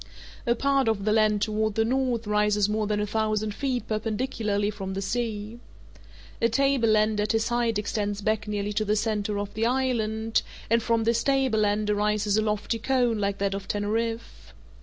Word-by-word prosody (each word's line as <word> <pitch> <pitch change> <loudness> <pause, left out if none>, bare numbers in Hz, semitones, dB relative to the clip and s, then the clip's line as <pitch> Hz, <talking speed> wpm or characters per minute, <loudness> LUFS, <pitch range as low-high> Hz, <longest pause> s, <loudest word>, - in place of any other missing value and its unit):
A 235 - +3
part 275 0 +1
of 210 -3 0
the 215 - +2
land 215 -1 +3
toward 215 0 -1
the 225 - +2
north 250 -2 0
rises 210 -1 +2
more 215 0 -1
than 210 0 0
a 210 - 0
thousand 215 0 -1
feet 255 +1 -2
perpendicularly 215 -2 -1
from 195 -2 -6
the - - -2
sea. 220 0 -3 0.8
A 230 - +4
tableland 225 -5 +2
at 210 - -1
this 225 0 +1
height 240 -2 +1
extends 205 -1 -2
back 215 0 0
nearly 205 0 -2
to 215 +1 0
the 210 0 +1
centre 210 -1 -1
of 205 0 -4
the 225 +2 0
island, 225 -4 0 0.3
and 230 0 +4
from 230 0 +1
this 230 +1 +2
tableland 215 -6 +1
arises 210 0 +1
a 215 - +3
lofty 215 +1 -1
cone 245 -2 +1
like 200 -1 -1
that 200 -1 -1
of 195 0 -5
Teneriffe. 220 - -3
215 Hz, 180 wpm, -26 LUFS, 210-230 Hz, 0.8 s, A